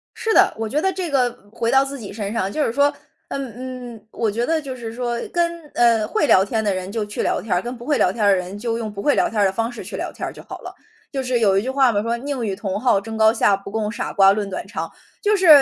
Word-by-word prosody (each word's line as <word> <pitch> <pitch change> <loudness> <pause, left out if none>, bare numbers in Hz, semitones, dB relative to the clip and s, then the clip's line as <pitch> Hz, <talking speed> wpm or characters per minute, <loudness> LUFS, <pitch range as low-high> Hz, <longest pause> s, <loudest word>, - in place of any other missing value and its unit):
是 450 - 0
的， - - +5
我 225 - -2
觉 290 +8 0
得 385 - +2
这 365 -3 -3
个 255 -3 +2 0.2
回 230 +1 -1
到 270 0 +5
自 275 0 -5
己 205 - -7
身 205 0 -4
上， 195 -4 -1
就 300 - 0
是 225 - 0
说， 285 +1 +3 0.4
嗯， 270 -4 -4 0.4
嗯， 215 0 -17
我 230 -2 0
觉 235 +4 -1
得 320 -1 +1
就 270 -3 -6
是 230 -3 -7
说 240 -1 -2
跟， 340 -1 0
呃， 230 -2 +4
会 325 -9 +1
聊 190 - +6
天 220 +2 -1
的 205 -2 +1
人 185 +1 -4
就 220 -1 -2
去 210 - -4
聊 - - 0
天 215 - -2
儿， 180 - +2
跟 245 +1 -5
不 240 - -10
会 295 -1 +2
聊 - - +3
天 220 -2 -3
儿 205 - +6
的 195 - +5
人 180 +3 -5
就 230 +1 -2
用 220 -2 -4
不 200 -1 -6
会 290 +6 +3
聊 - - +2
天 220 - -2
儿 200 - +5
的 190 - +3
方 225 +4 -1
式 240 - -8
去 - - -7
聊 - - -4
天 - - -5
儿 - - -6
就 - - -11
好 - - -9
了。 - - -9 0.4
就 270 -2 -2
是 250 -1 +1
有 195 -4 +4
一 195 - +2
句 255 - -3
话 265 -2 +4
嘛， 205 -2 +1
说 230 +1 0
“宁 265 -2 -3
与 195 - -2
同 195 0 -3
好 235 -4 +3
争 225 +2 -6
高 220 0 +5
下， 205 -3 +3
不 200 0 -9
共 215 -1 -1
傻 - - -4
瓜 195 -1 +6
论 205 0 -1
短 185 - -5
长”。 - - -5 0.3
就 420 0 +4
是 375 -3 +2
230 Hz, 325 characters per minute, -21 LUFS, 205-270 Hz, 0.4 s, 聊